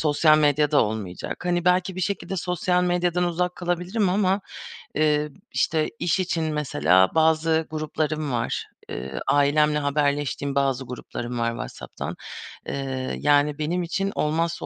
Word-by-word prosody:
sosyal 155 0 +4
medya 150 0 +3
da 150 - +5
olmayacak. 105 - -5
Hani, 175 -1 +1
belki 180 +1 +2
bir - - -2
şekilde 195 0 -2
sosyal 180 +1 0
medyadan 180 0 +1
uzak 180 +1 -1
kalabilirim 180 +4 0
ama, 195 +1 +2 0.6
eee, 150 0 +2 0.2
işte, 155 -1 +1
iş 175 +1 +1
için 170 -3 0
mesela 95 - +3
bazı 160 0 +3
gruplarım 155 -1 -2
var. 115 -1 -1 0.2
Eee, 65 +1 -5
ailemle 150 +1 +3
haberleştiğim 145 -1 0
bazı 135 -1 +1
gruplarım 120 -1 -6
var 115 0 +1
WhatsApp'tan. 115 - -6 0.5
Eee, 135 -1 -3
yani 145 0 +3
benim 170 +4 -1
için 195 +4 -1
olmazsa 165 +2 0
155 Hz, 135 wpm, -24 LUFS, 140-175 Hz, 0.6 s, da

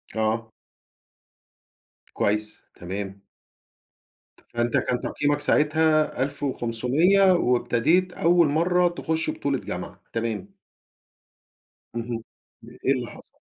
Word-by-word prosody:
آه. 110 +1 -1 1.6
كويس، 105 +1 -1
تمام. 95 +2 -6 1.3
فأنت 120 0 +1
كان 125 - 0
تقييمك 145 0 0
ساعتها 155 -1 +2
1500 140 - +2
وابتديت 160 +5 +2
أول 170 0 +4
مرّه 175 +4 +3
تخش 165 -2 -2
بطولة 140 -2 -1
جامعة، - - -7
تمام. 115 - -3 1.4
اهم، 115 -1 -4 0.4
ده - - -13
إيه 135 - +4
اللي 125 -3 -3
حصل؟ - - -16
135 Hz, 90 wpm, -25 LUFS, 115-160 Hz, 1.6 s, أول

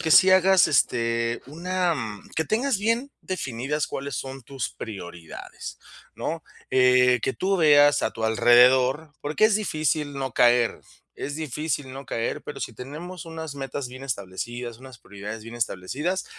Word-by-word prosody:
que 160 -2 -1
sí 185 +4 +8
hagas, 190 0 +6
este, 115 -4 +1
una 175 +3 -1 0.4
que 160 - +1
tengas 235 0 +1
bien 230 +6 0
definidas 140 -4 -3
cuáles 140 -2 -5
son 135 0 -6
tus 135 +1 -4
prioridades, 90 -6 -8 0.4
¿no? - - -4 0.3
Eh, 125 -1 +5
que 135 - 0
tú 195 +1 0
veas 145 -2 +6
a - - +1
tu 110 - -4
alrededor, 125 +6 +5
porque 150 +8 +1
es 215 -2 +5
difícil 155 -7 -1
no 135 -3 -3
caer, 120 -1 +3 0.3
es 145 - -5
difícil 150 -2 -3
no 135 +1 -8
caer, 115 - -2
pero 145 - -7
si 115 - -4
tenemos 155 +10 -8
unas 160 -3 -7
metas 135 -1 -4
bien 130 +2 -9
establecidas, 120 +2 -5
unas 130 -3 -12
prioridades 105 +2 -8
bien 115 +1 -9
establecidas, 130 - -2
135 Hz, 150 wpm, -25 LUFS, 120-160 Hz, 0.4 s, sí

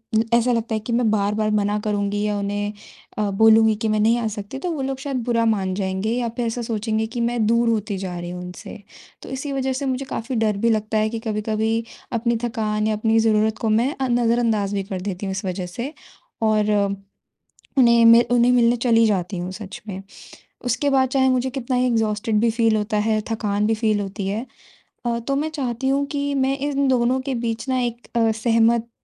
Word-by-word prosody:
उम, 220 - +5
ऐसा 240 +1 +4
लगता 230 -1 -1
है - - -1
कि 235 +3 -5
मैं 235 -1 +2
बार-बार 215 +1 +1
मना 205 0 0
करूँगी 205 -1 -1
या 210 -1 0
उन्हें 205 +1 -2 0.4
अ, 210 -1 0
बोलूँगी 220 +1 +5
कि 225 - 0
मैं 215 0 +1
नहीं 225 +3 +3
आ 230 - -1
सकती 205 +6 -7
तो 350 +4 -3
वो 295 -4 -3
लोग 265 0 -2
शायद 275 -2 -3
बुरा 235 -2 +1
मान 195 -4 +1
जाएँगे 190 +2 -2
या 240 0 -1
फिर 240 - 0
ऐसा 230 +1 -2
सोचेंगे 220 -1 -1
कि 240 - -1
मैं 235 -1 0
दूर 235 +1 +3
होती 215 -3 -1
जा 185 -2 -5
रही 175 0 -6
हूँ 180 0 -6
उनसे। 180 +4 -9 0.4
तो - - -10
इसी 265 +2 -4
वजह 265 -1 -1
से 275 +2 -3
मुझे 260 +1 -2
काफ़ी 245 0 -4
डर 215 -2 +1
भी 230 +3 +1
लगता 215 -1 0
है 215 0 +2
कि 230 0 -4
कभी-कभी 220 +1 -1 0.3
अपनी 235 0 +1
थकान 215 -2 -1
या 220 - +1
अपनी 225 +1 +2
ज़रूरत 220 -1 +2
को 225 - 0
मैं 235 +6 +2
अ, 265 - -2
नज़रअंदाज 230 -4 +1
भी 200 -1 -1
कर 190 -1 -5
देती 195 0 -4
हूँ 195 - -2
इस 195 +1 -4
वजह 185 0 -3
से, 235 - -6 0.5
और 215 -1 +2 1.1
उन्हें 235 -2 +6
मि 230 +1 +8
उन्हें 245 0 +4
मिलने 240 -1 +4
चली 230 -1 +3
जाती 190 -2 -1
हूँ 180 +1 -4
सच 200 0 -8
में। 190 0 -5 0.6
उसके 250 +4 +1
बाद 265 -2 +3
चाहे 265 0 +2
मुझे 255 0 +1
कितना 255 -1 -3
ही 250 +1 +2
एक्सहॉस्टेड 220 -1 0
भी 230 - +3
फील 225 -1 +2
होता 210 0 -1
है, 215 0 +1
थकान 210 -2 0
भी 225 - +2
फील 215 -1 +1
होती 195 0 -4
है 215 +5 -2 0.6
अ, 235 0 0
तो 275 +4 -2
मैं 300 +3 -1
चाहती 265 -4 -3
हूँ 280 +1 +1
कि 285 0 -2
मैं 270 0 +1
इन 280 0 0
दोनों 255 0 +2
के 265 0 -3
बीच 230 +2 -3
ना 255 - +1
एक 240 0 -4
अ, 225 -1 +3
सहमत 230 +1 +2
225 Hz, 220 wpm, -22 LUFS, 210-245 Hz, 1.1 s, मि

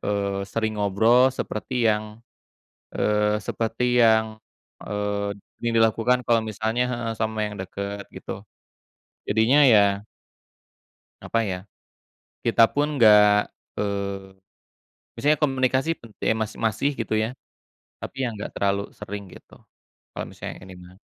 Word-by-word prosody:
eee, 100 -1 -1
sering 110 -1 -2
ngobrol 110 +6 +4
seperti 130 -1 -5 0.2
yang, 105 +2 -6 0.7
eee, 105 0 +2
seperti 120 +3 0
yang, 110 -1 +5 0.6
eee, 105 0 -2 0.3
dilakukan 115 +2 +2
kalau 115 -1 +3
misalnya 110 +3 -1
heeh, 120 -2 -3
sama 110 -1 -1
yang 105 - -6
deket 100 +2 -6
gitu. - - -8 0.8
Jadinya 115 +8 +4
ya 100 -4 +4 1.2
Apa 115 - 0
ya, 90 - -2 0.9
kita 115 0 +4
pun 145 +1 +1
enggak, 105 -4 +6 0.2
eee, 100 -1 -3 0.8
misalnya 150 +1 +2
komunikasi 135 +1 +1
pen 115 - -14
eh, - - +3
mas 110 -1 -2
masih 115 +5 0
gitu 110 - -3
ya, 110 - 0 0.7
tapi - - -7
ya, - - +1
enggak 105 - -6
terlalu 100 0 0 0.2
sering 100 0 -6
gitu, - - -16 0.6
kalau - - -3
misalnya - - -7
ini 95 0 -11
mah. 90 - -15
110 Hz, 120 wpm, -24 LUFS, 100-115 Hz, 1.2 s, enggak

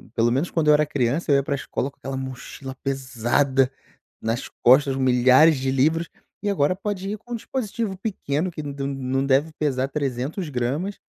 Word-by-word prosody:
pelo 115 0 +3
menos 140 +8 0
quando 160 -3 0
eu - - +8
era 150 +1 +4
criança, 145 +2 0
ia 140 0 +4
pra 140 +1 -2
escola 135 0 -3
com - - -36
aquela 135 0 -5
mochila 130 0 -7
pesada 130 0 +1 0.5
nas 115 +3 -2
costas, 135 +2 +5
milhares 130 +4 +5
de 130 0 -1
livros, 160 +5 +1 0.3
e 205 - 0
agora 180 -2 +2
pode 195 0 -4
ir 210 - -3
com 240 +2 -9
um - - 0
dispositivo 220 -4 -3
pequeno 185 -5 -2
que 155 -2 -6
não 145 - -5
de 140 0 -5
não 135 -1 -1
deve 140 +4 +2
pesar 135 -3 0
300 140 +4 -3
gramas, 140 +10 -2
140 Hz, 185 wpm, -23 LUFS, 130-165 Hz, 0.5 s, eu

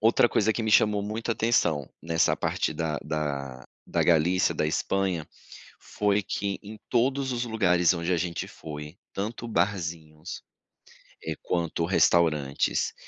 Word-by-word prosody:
outra 115 +2 +4
coisa 110 0 +2
que 115 - -3
me 110 - 0
chamou 105 0 +4
muita 110 +3 -3
atenção 85 - +1
nessa 85 0 +2
parte - - -1
da 80 -3 -2
da 70 -4 -3 0.2
da - - +1
Galícia 85 +2 +3
da - - 0
Espanha, 90 +1 -1 0.5
foi 105 0 0
que 100 0 -3
em 105 +2 -9
todos 130 +2 +1
os 120 -1 -1
lugares 90 -7 +3
onde 85 0 -2
a - - +2
gente 85 0 -3
foi, 75 +1 -8 0.2
tanto 110 +4 -4
barzinhos, 85 -5 -2 0.8
eh, - - -2
quanto 85 -1 -1
restaurantes, 80 -6 +2
90 Hz, 140 wpm, -27 LUFS, 80-105 Hz, 0.8 s, outra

